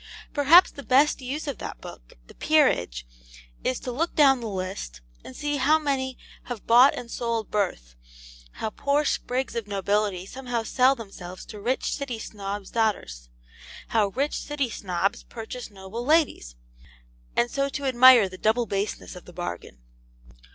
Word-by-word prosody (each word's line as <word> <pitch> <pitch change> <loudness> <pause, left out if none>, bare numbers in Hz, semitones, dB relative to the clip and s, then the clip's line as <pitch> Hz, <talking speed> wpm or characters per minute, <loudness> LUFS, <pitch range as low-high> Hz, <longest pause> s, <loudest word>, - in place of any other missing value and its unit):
Perhaps 310 +5 +6
the 280 - -9
best 280 +2 +3
use 280 +5 -4
of 280 - -4
that - - -7
book, - - -12
the - - -15
'Peerage,' 90 - +2 0.6
is 130 - -1
to 250 - -4
look 320 +8 -2
down 270 -3 +5
the 230 - -4
list, 185 - -5 0.2
and 130 - -11
see 290 0 -2
how 295 +3 +4
many 270 -4 -2 0.3
have 245 -4 -7
bought 245 +4 +6
and 235 -1 -8
sold 230 -2 -2
birth, 120 - -2 0.6
how 220 - -4
poor 285 +6 0
sprigs 260 -2 -2
of 230 -3 -3
nobility 200 -1 -1
somehow 245 +1 -4
sell 255 +4 +3
themselves 195 -6 -9
to 210 - -10
rich 250 +5 -1
City 275 -5 -4
Snobs' 205 -2 -6
daughters, - - -1 0.6
how 215 -3 +2
rich 275 +9 -2
City 280 -5 -2
Snobs 190 -1 -1
purchase 240 +2 -8
noble 200 +3 -7
ladies 290 - +1 0.8
and 240 - +2
so 275 0 0
to 280 0 -5
admire 255 -4 +7
the 185 0 -11
double 225 +2 +2
baseness 200 -2 -3
of 180 - -11
the 180 - -13
bargain. 85 - -7
230 Hz, 160 wpm, -25 LUFS, 195-270 Hz, 0.8 s, admire